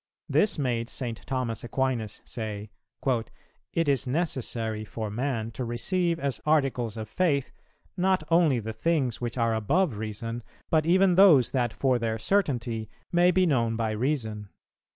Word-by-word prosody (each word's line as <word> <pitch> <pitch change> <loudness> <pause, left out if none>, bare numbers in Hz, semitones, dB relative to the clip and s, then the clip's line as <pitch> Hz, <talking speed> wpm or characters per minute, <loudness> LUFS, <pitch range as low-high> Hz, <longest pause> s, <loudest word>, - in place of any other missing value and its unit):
This 210 -3 +3
made 120 -4 -1
St. 120 -3 -4
Thomas 125 -4 -2
Aquinas 120 -3 -2
say: 105 -3 -5 0.3
'It 130 +6 -3
is 135 -3 +1
necessary 120 -7 -2
for 110 0 -5
man 115 -1 -2
to 125 - -5
receive 170 +9 0
as 140 -3 -2
articles 135 -7 +1
of 110 -1 -5
Faith, 145 - 0 0.4
not 185 -2 +2
only 165 -6 +4
the 110 0 -5
things 130 -1 0
which 120 0 -3
are 115 -1 +2
above 135 - +1
Reason, 115 +2 -4 0.3
but 155 -1 +3
even 185 +1 +5
those 175 - +6
that 120 -3 +1
for 130 0 +1
their 115 -1 -1
certainty 120 - 0 0.2
may 175 +1 +5
be 185 +1 +3
known 115 -8 +1
by 110 -1 -1
Reason. 110 -4 -2
125 Hz, 150 wpm, -27 LUFS, 115-155 Hz, 0.4 s, those